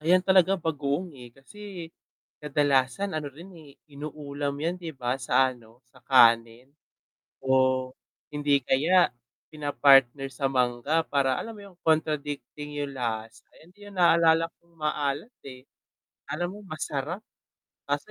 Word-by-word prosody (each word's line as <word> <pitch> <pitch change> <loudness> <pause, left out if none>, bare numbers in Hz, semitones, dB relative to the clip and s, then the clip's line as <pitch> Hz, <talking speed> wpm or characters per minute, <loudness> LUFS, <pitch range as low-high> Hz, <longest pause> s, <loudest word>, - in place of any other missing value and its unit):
Ayan 175 +4 +4
talaga 190 0 +3
bagoong, 150 +2 -2
eh. 120 -2 -12
Kasi, 180 - -10 0.6
kadalasan 145 +4 +1
ano 145 -2 -4
rin, 165 +7 -12
eh, 145 -3 -16
inuulam 145 -1 -5
yan 170 +3 -1
di 170 -3 -7
ba 125 -2 -2
sa 130 +1 +2
ano, 115 +1 -20
sa 125 0 -22
kanin. 115 -1 +4 0.8
O, 130 -1 +2 0.4
hindi 145 -2 +1
kaya 165 +8 +3 0.4
pina-partner 140 -2 +3
sa 135 +3 -1
mangga 130 +4 +1
para 135 -3 +1
alam 230 - -5
mo 210 - -12
yung 185 -3 -19
contradicting 150 -2 -1
yung 140 -1 -5
lasa, 115 -2 -4
ayan 165 - -19
din 205 0 -15
yung 190 - -7
naalala 165 -1 +5 0.2
kong 170 0 -29
maalat, 150 - -2
eh. 130 0 -12 0.6
Alam 175 +7 -4
mong 200 - -15
masarap 155 +10 -4 0.7
kaso - - -2
145 Hz, 135 wpm, -27 LUFS, 130-165 Hz, 0.8 s, naalala